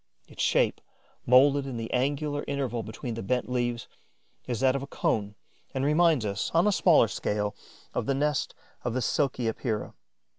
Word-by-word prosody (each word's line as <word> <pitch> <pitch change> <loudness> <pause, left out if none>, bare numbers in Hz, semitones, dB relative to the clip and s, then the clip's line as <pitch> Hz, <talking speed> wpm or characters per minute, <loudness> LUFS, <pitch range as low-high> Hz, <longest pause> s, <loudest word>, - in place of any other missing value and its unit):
Its - - -7
shape, - - +2 0.5
moulded 135 +3 +5
in 130 -3 -5
the 115 0 -5
angular 145 +3 0
interval 135 -4 -2
between 110 +3 -6
the 115 - -5
bent 125 +5 -1
leaves, 120 -1 -2 0.6
is 120 -3 -2
that 130 0 +3
of 135 - -1
a 140 - -6
cone 105 -6 -1 0.4
and 135 +1 0
reminds 155 -4 +3
us, 100 -1 -2
on 170 - +5
a 210 - +4
smaller 170 - +5
scale, 105 0 -2 0.4
of - - -2
the 135 - +1
nest 145 0 0 0.3
of 120 -1 -2
the 130 - 0
Silky 130 -2 0
Epeira. 110 -1 -2
130 Hz, 175 wpm, -28 LUFS, 115-140 Hz, 0.6 s, moulded